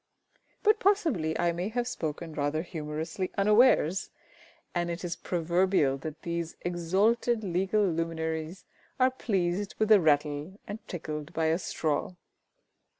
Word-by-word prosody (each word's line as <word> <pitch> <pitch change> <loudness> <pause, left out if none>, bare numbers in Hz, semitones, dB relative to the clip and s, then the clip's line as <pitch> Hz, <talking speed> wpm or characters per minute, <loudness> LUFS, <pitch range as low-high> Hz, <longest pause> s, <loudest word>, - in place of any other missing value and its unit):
But 430 +1 +4
possibly 310 - +2
I 170 - +2
may 175 +4 -3
have 240 +1 -1
spoken 160 -6 -4
rather 150 +1 -1
humorously 160 +2 -4
unawares, 205 -4 +4 0.6
and 175 -1 -1
it 170 +1 -4
is 175 -1 -2
proverbial 170 -4 +1
that 155 +2 -7
these 170 -1 -3
exalted 200 +7 +1
legal 195 +3 +1
luminaries 160 0 -2 0.3
are 255 0 +5
pleased 195 -5 -1
with 215 0 +1
a 210 -3 +8
rattle 150 +4 +1
and 205 +2 -5
tickled 155 -3 -5
by 160 - 0
a 165 - 0
straw. 160 0 -2
175 Hz, 130 wpm, -29 LUFS, 160-205 Hz, 0.6 s, a